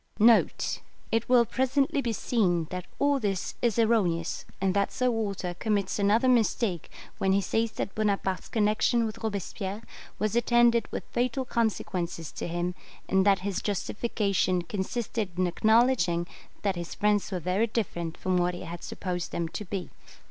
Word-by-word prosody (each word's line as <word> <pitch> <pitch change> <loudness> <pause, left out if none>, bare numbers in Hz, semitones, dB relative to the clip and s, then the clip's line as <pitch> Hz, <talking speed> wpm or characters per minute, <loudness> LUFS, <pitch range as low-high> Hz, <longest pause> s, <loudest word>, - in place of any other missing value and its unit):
[It 225 +1 0
will 245 -2 +6
presently 270 +5 +1
be 235 - -1
seen 185 -7 +1
that 180 -1 -5
all 285 -1 +2
this 195 -5 -2
is 235 -2 +1
erroneous, 200 -8 +1
and 190 -1 +1
that 200 0 +1
Sir 255 -1 +1
Walter 200 -5 -2
commits 205 0 -1
another 210 +5 +3
mistake 225 - +1 0.3
when 190 0 +2
he 195 - +4
says 225 +4 0
that 195 - -4
Bonaparte's 200 -3 -1
connection 220 +2 +2
with 220 +1 -5
Robespierre 200 0 -4 0.3
was 215 +1 -1
attended 240 0 +3
with - - -4
fatal 250 +2 0
consequences 185 -9 -2
to - - -5
him, 175 +1 -2 0.3
and 190 +1 +3
that 195 -2 +4
his 200 -2 -1
justification 200 -3 0
consisted 205 0 -3
in 185 - +2
acknowledging 215 -3 +3 0.4
that 200 -2 +1
his 170 -1 -5
friends 210 -1 +1
were 185 - -1
very 185 +7 +1
different 175 -7 -3
from 185 -1 0
what 175 0 +1
he - - -7
had 170 +1 -7
supposed 180 -2 -4
them 170 -1 -2
to 210 - -5
be. 185 -1 -5
205 Hz, 155 wpm, -28 LUFS, 180-230 Hz, 0.4 s, will